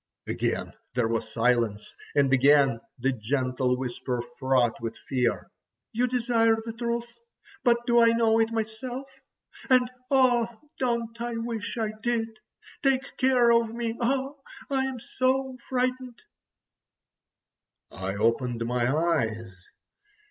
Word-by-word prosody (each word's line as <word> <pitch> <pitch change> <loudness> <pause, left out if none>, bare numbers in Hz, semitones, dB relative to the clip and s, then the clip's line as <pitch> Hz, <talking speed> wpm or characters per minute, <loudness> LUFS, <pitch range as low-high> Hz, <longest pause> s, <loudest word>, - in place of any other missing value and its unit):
Again - - -2 0.2
there 120 -2 +2
was 115 0 -2
silence, 115 -3 +1 0.2
and 135 -2 +3
again 135 -2 +5 0.2
the 130 +2 +1
gentle 125 +1 0
whisper 125 -1 -3 0.2
fraught 130 -4 +2
with 115 -1 -4
fear! 125 -2 0 0.4
"You 245 +3 +2
desire 230 -2 +2
the 225 - -5
truth—but 235 - -3
do 240 -1 +4
I 230 - +6
know 230 -1 +3
it 225 0 +2
myself? 230 +4 -4 0.6
And 255 -1 +5 0.2
oh! 250 -4 +4 0.3
don't 235 -2 -1
I 235 -1 -3
wish 230 -1 -4
I 220 -2 -1
did? 230 -1 0 0.5
Take 270 0 +1
care 255 -3 +4
of 230 -1 +2
me; 230 -1 -2
oh! 270 +3 -1 0.3
I'm 265 -2 0
so 260 +2 0
frightened!" 255 -3 -2 1.7
I 95 +1 -4
opened 115 +2 0
my 125 +1 +1
eyes. 115 - -1
225 Hz, 120 wpm, -27 LUFS, -, 1.7 s, I